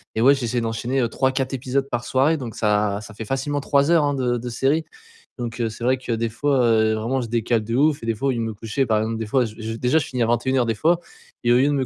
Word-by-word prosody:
Et 110 - 0
ouais 140 +3 +6
j'essaie 120 -2 -2
d'enchaîner, 115 +4 -1
heu 115 - 0
3-4 130 +2 0
épisodes 135 +2 -1
par 120 -1 -3
soirée 140 +6 +2
donc 120 -5 -7
ça 105 -1 +1
ça 110 0 -11
fait 110 - -6
facilement 135 +4 -2
3 140 +1 +2
heures 165 -3 +5
hein 145 - +1
de 125 -3 0
de 120 +1 -5
série. 135 +7 +1 0.5
Donc 120 -1 -5
heu, 115 - 0
c'est 110 - -9
vrai 130 +1 +3
que 125 -1 -6
des 115 0 0
fois, 135 +4 0
heu, 110 -1 +3
vraiment 120 +4 -1
je 120 - -4
décale 115 0 0
de 115 +2 -5
ouf 145 -1 +2
et - - -4
des 115 - +1
fois 125 +6 -2
au - - +3
lieu 120 - -2
de - - -1
me 110 -1 -3
coucher, 115 +6 -2
par 110 -3 +2
exemple 110 +1 -2
des 110 - -3
fois 125 +4 +2
j 110 -1 -8
j 115 0 -5
déjà 125 +6 +2
je 155 - +1
finis 125 -2 -4
à - - +3
21:00 120 +2 +1
des 115 - -1
fois. 165 +9 +2 0.4
Et 120 - +3
au - - +5
lieu 135 +3 +4
de 145 - +2
me 135 -2 0
120 Hz, 300 wpm, -22 LUFS, 115-135 Hz, 0.5 s, ouais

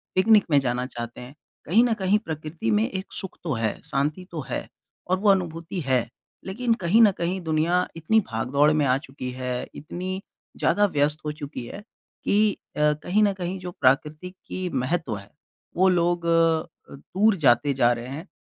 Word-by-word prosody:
Picnic 210 +2 +5
में 145 - +6
जाना 125 -1 -1
चाहते 120 -1 -7
हैं। 125 +3 -10 0.3
कहीं 220 +10 +4
न 240 -2 +2
कहीं 190 +2 +3
प्रकृति 155 - -4
में 105 +2 +2
एक 190 +1 -4
सुख 190 - -1
तो 155 -6 -1
है, 115 -2 -2
शांति 150 +7 -1
तो 160 -3 -4
है, - - -3 0.4
और 185 +1 +2
वो 205 0 +3
अनुभूति 175 -1 0
है, 130 -4 +1 0.4
लेकिन 230 +5 0
कहीं 210 +7 +5
न 210 -3 +7
कहीं 180 +2 -1
दुनिया 170 +3 +1
इतनी 165 +8 +2
भाग 115 +2 -2
दौड़ 145 +2 +4
में 150 -2 +2
आ 130 0 +3
चुकी 135 -2 -7
है, 125 -1 -4
इतनी 185 +5 -5 0.4
ज़्यादा 205 0 +3
व्यस्त 150 -3 0
हो 150 - -1
चुकी 145 -4 -7
है 205 - -9 0.4
कि 210 +1 +3 0.3
अ, - - -2 0.2
कहीं 210 +4 +2
न 200 - +4
कहीं 185 0 -4
जो 180 -1 -6
प्राकृतिक 150 +7 0
की 185 -1 -4
महत्व 135 -2 -1
है, 100 +1 -13 0.5
वो 190 +1 +5
लोग 175 -1 +1
अ, 165 -2 0
दूर 195 +9 +1
जाते 140 -3 +3
जा 120 -2 +3
रहे 120 +1 -6
हैं। 155 +8 -7
160 Hz, 185 wpm, -25 LUFS, 135-185 Hz, 0.5 s, न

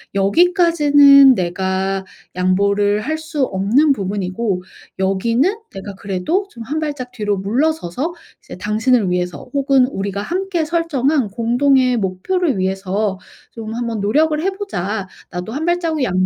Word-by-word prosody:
"여기까지는 290 - +5
내가 190 +1 -2 0.3
양보를 200 +3 +1
할 310 +7 -2
수 315 -3 -2
없는 225 +10 +2
부분이고 195 -2 -2 0.4
여기는 230 - +1 0.2
내가 195 +1 -7
그래도 200 - -2
좀 235 -8 -10
1 295 +7 -3
발짝 290 -5 -4
뒤로 210 -3 -2
물러서서 265 - -1 0.3
이제 - - -10
당신을 215 +2 +1
위해서 180 -1 -3
혹은 275 -2 +3
우리가 200 -5 -4
함께 355 - -2
설정한 305 -5 0
공동의 250 +4 +2
목표를 225 - -1
위해서 190 +1 -1 0.3
좀 220 -1 -7
한번 230 -3 -3
노력을 300 +9 +2
해 375 - +1
보자. 220 - -4 0.2
나도 180 +4 -5
1 300 +4 -3
발자국 340 -3 0
양 185 -5 +1
230 Hz, 285 characters per minute, -18 LUFS, 195-300 Hz, 0.4 s, 여기까지는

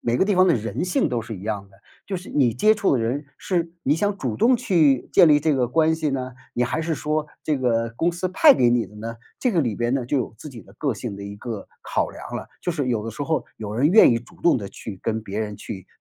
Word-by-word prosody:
每 120 0 0
个 190 - +3
地 205 - +1
方 185 0 +5
的 - - +5
人 115 0 -3
性 180 0 +1
都 120 -2 -1
是 110 -1 -7
一 90 - -10
样 100 -2 -4
的。 95 - -22 0.3
就 195 - -3
是 180 - -9
你 125 -6 +2
接 215 - +4
触 205 -10 +2
的 115 - -1
人 135 +6 -2
是， 170 -2 -2
你 140 - +2
想 205 +4 0
主 125 - -3
动 250 +1 +5
去 165 - +2
建 170 - +7
立 150 -1 +6
这 150 0 +1
个 125 -3 +1
关 160 +4 +3
系 160 -1 -1
呢， 130 -2 -3 0.2
你 125 - +1
还 125 +6 -2
是 165 0 -1
说 155 +1 -1 0.2
这 150 -3 0
个 115 -2 0
公 165 +8 +1
司 175 +2 -3
派 280 - +6
给 120 -1 +3
你 120 -1 +2
的 105 - -16
呢？ 115 +2 -6 0.2
这 250 - +1
个 175 - +3
里 120 -8 -1
边 120 +1 0
呢， 130 -3 -1
就 145 - 0
有 125 -4 -2
自 150 - -9
己 120 -5 -11
的 - - -19
个 140 -5 0
性 105 0 -5
的 100 - -8
一 100 0 -7
个 110 -1 -6
考 - - -1
量 - - -10
了。 - - -5
就 175 - -1
是 145 -5 -2
有 110 -4 -1
的 115 - -4
时 115 - -6
候 160 +2 -1
有 105 -1 -5
人 130 +5 +3
愿 210 +6 +7
意 115 - +2
主 125 +9 -17
动 170 - +4
地 105 -5 -5
去 100 -4 -8
跟 110 0 -1
别 105 0 -4
人 105 -1 -3
去 95 -3 -8
130 Hz, 305 characters per minute, -23 LUFS, 115-165 Hz, 0.3 s, 建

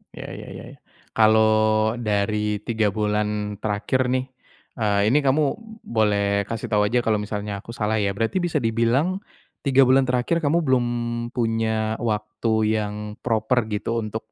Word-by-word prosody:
Ya - - -8
ya - - -9
ya. - - -8 0.5
Kalau 110 0 +3
dari 105 -1 0
3 110 -2 0
bulan 105 -1 -1
terakhir 110 +5 0
nih, 130 +1 0 0.5
eee, 105 -1 +2
ini 150 - +4
kamu 140 +2 +2 0.4
boleh 100 -2 +1
kasih 115 -1 -4
tahu 105 -1 +3
saja 120 +3 +2
kalau 110 -2 +2
misalnya 105 -1 -4
aku 115 +2 -10
salah 110 -1 0
ya. 100 -1 0
Berarti 115 - -1
bisa 175 -3 0
dibilang, 115 - +1 0.5
3 135 0 +5
bulan 130 +1 +4
terakhir 125 +7 +1
kamu 165 +2 +1
belum 130 -4 +2 0.5
punya 110 -2 0
waktu 110 0 -2 0.3
yang 105 0 -3 0.3
proper 115 0 0
gitu 115 +2 -2
untuk 110 +1 -6
110 Hz, 145 wpm, -23 LUFS, 105-125 Hz, 0.5 s, 3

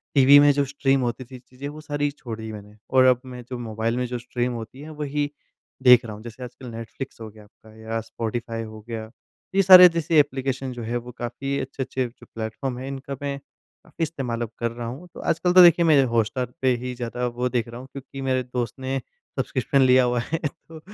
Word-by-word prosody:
TV 140 +1 +8
में 145 0 +7
जो 140 0 +1
stream 135 -1 +1
होती 120 +1 -2
थी 130 +1 -11
चीज़ें 125 +3 -9
वो 150 +1 -8
सारी 145 -1 -1
छोड़ 120 -6 -8
दी 110 0 -6
मैंने 105 -1 -10
और 130 0 +5
अब 125 -1 +4
मैं 125 -1 -8
जो 125 - -4
मोबाइल 115 0 -2
में 125 - 0
जो 125 0 -3
स्ट्रीम 120 +1 -2
होती 115 +3 -8
हैं 155 - -9
वही 145 0 -1 0.5
देख 125 -2 +8
रहा 110 - -6
हूँ 105 - -12
जैसे 120 +2 -9
आजकल 125 +1 -10
नेटफ्लिक्स 115 +2 -8
हो 110 - -6
गया 105 0 -15
आपका 110 +1 -20
या 110 +1 -4
स्पॉटिफ़ाई 115 0 -4
हो 110 0 -9
गया। 110 -1 -5 0.5
ये 195 - +6
सारे 180 -1 +11
जैसे 165 -1 +2
एप्लिकेशन 135 -2 0
जो 120 -1 -7
है 120 +2 -2
वो 120 +1 -8
काफ़ी 130 +4 -3
अच्छे-अच्छे 130 -1 -3
जो 120 - -17
प्लेटफ़ॉर्म 115 +3 -4
है 130 - -6
इनका 135 0 -6
मैं, 140 -1 -2 0.5
काफ़ी 165 - -5
इस्तेमाल 130 -7 -3
अब 115 -2 -3
कर 115 -1 -1
रहा 120 0 -6
हूँ। 135 +10 -7
तो - - -10
आजकल 180 +2 +1
तो 185 - +9
देखिए 170 0 +6
मैं 150 -4 +6
हॉटस्टार 120 +1 -1
पे 130 -1 +3
ही 125 - -3
ज़्यादा 120 0 -3
वो 125 +1 -2
देख 120 -2 -1
रहा 115 +1 -8
हूँ, 130 - -10
क्योंकि 135 0 -9
मेरे 130 -1 0
दोस्त 125 -1 -3
ने 135 +1 -2 0.4
सब्स्क्रिप्शन 140 - +1
लिया 130 0 +6
हुआ 120 0 +1
है 165 - 0
तो 160 +2 -13
125 Hz, 225 wpm, -24 LUFS, 115-140 Hz, 0.5 s, सारे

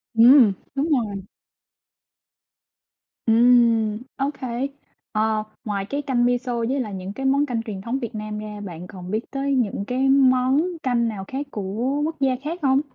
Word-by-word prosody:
Ừm, 235 -2 +7 0.2
đúng 285 +4 0
rồi. 215 - 0 2.0
Ừm, 230 -2 +4 0.2
okay. 270 -2 -2 0.4
Ờ, 215 0 +1 0.2
ngoài 200 -2 -2
cái 285 +6 -3
canh 260 -4 +1
miso 245 0 0
với 240 +4 0
lại 215 -6 -3
những 190 +1 -6
cái 270 +5 -5
món 280 +2 +3
canh 235 -4 -2
truyền 210 -4 -6
thống 240 +6 -2
Việt 235 -2 -5
Nam 215 0 -5
ra, 210 -1 -7
bạn 180 -2 -8
còn 185 -1 -9
biết 220 +3 -3
tới 275 0 -1
những 205 -5 0
cái 260 +3 +1
món 260 +1 +4 0.2
canh 240 -2 +1
nào 205 -4 -4
khác 275 +2 -4
của 210 - -4 0.4
quốc 320 +1 -3
gia 265 -2 +2
khác 330 +4 -4
không? 270 0 +3
240 Hz, 165 wpm, -23 LUFS, 215-270 Hz, 2.0 s, Ừm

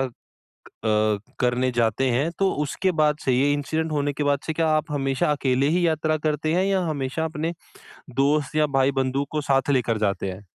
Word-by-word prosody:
अ, 135 -1 -1 1.3
करने 125 +1 +1
जाते 120 +2 +1
हैं। 135 +7 +1
तो 195 -1 +2
उसके 185 +6 -1
बाद 150 -1 +3
से 130 - +2
ये 140 +3 +3
इंसिडेंट 155 +3 -2
होने 145 -1 0
के 145 +1 -3
बाद 145 0 +2
से, 160 - -1
क्या 160 0 0
आप 155 0 +1
हमेशा 135 0 0
अकेले 135 -2 +1
ही 175 -1 +2
यात्रा 155 -1 +1
करते 155 +1 0
हैं 185 +2 +2
या 195 -1 +1
हमेशा 150 0 -2
अपने 160 +1 -3 0.7
दोस्त 145 +1 +1
या 155 - +4
भाई-बंधु 135 0 +1
को 155 - -1
साथ 135 -1 +1
लेकर 120 -5 +1
जाते 100 -2 -1
हैं? 95 +2 -10
145 Hz, 185 wpm, -24 LUFS, 130-155 Hz, 1.3 s, या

